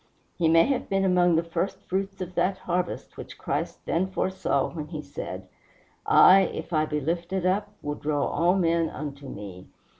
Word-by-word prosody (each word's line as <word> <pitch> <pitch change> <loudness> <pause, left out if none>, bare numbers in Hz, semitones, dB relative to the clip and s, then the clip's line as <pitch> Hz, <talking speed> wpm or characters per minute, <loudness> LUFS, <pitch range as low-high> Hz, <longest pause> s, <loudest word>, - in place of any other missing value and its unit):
He 165 -2 +2
may 165 0 +6
have 270 -3 -1
been 195 -1 +1
among 180 -2 +4
the 165 - +2
first 170 +3 -2
fruits 195 +1 -3
of 185 0 -5
that 185 +1 +1
harvest 180 0 -3
which - - -9
Christ - - -3
then 180 +3 +1
foresaw 190 -6 -1
when 155 -3 -5
he 155 -2 -6
said, - - -7 0.6
"I, 190 +1 +8
if 180 - -3
I 155 0 +2
be 150 0 -1
lifted 170 +5 -2
up, 200 +3 +1
will 145 - -2
draw 145 -1 -1
all 175 +4 +2
men 170 -3 +2
unto 140 -2 -7
me." 95 -3 -9
170 Hz, 180 wpm, -26 LUFS, 155-185 Hz, 0.6 s, I